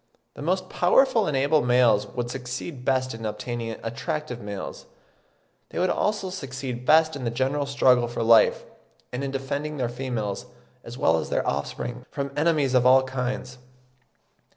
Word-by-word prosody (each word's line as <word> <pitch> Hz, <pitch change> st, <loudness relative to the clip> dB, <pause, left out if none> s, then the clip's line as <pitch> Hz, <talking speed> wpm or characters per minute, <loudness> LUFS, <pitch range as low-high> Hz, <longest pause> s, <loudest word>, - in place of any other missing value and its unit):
The -, -, -10 dB
most 185 Hz, +4 st, 0 dB
powerful 230 Hz, +6 st, +3 dB
and 145 Hz, -3 st, 0 dB
able 145 Hz, +3 st, +3 dB
males 120 Hz, -4 st, +4 dB
would 120 Hz, -1 st, -4 dB
succeed 125 Hz, +2 st, -6 dB
best 130 Hz, -1 st, +1 dB
in 115 Hz, 0 st, -8 dB
obtaining 115 Hz, +2 st, -4 dB
attractive 125 Hz, +3 st, -4 dB
females. 100 Hz, -3 st, -7 dB, 0.8 s
They -, -, -8 dB
would 180 Hz, +1 st, +2 dB
also 205 Hz, -3 st, -1 dB
succeed 130 Hz, -6 st, -6 dB
best 160 Hz, 0 st, +5 dB
in 140 Hz, -, -6 dB
the 115 Hz, -, 0 dB
general 135 Hz, +4 st, -1 dB
struggle 130 Hz, -3 st, +3 dB
for 115 Hz, -1 st, -3 dB
life, 115 Hz, 0 st, +5 dB, 0.5 s
and 125 Hz, +3 st, -3 dB
in 140 Hz, -, -2 dB
defending 140 Hz, +3 st, -3 dB
their 125 Hz, -3 st, -1 dB
females, 120 Hz, -3 st, -4 dB, 0.4 s
as 120 Hz, +1 st, -9 dB
well 80 Hz, -10 st, +3 dB
as 80 Hz, -, -3 dB
their -, -, 0 dB
offspring, 125 Hz, +1 st, -3 dB
from 140 Hz, -1 st, -4 dB
enemies 150 Hz, -3 st, +2 dB
of 125 Hz, -1 st, +4 dB
all 130 Hz, +1 st, +6 dB
kinds. 125 Hz, -1 st, -4 dB
130 Hz, 160 wpm, -25 LUFS, 120-145 Hz, 0.8 s, all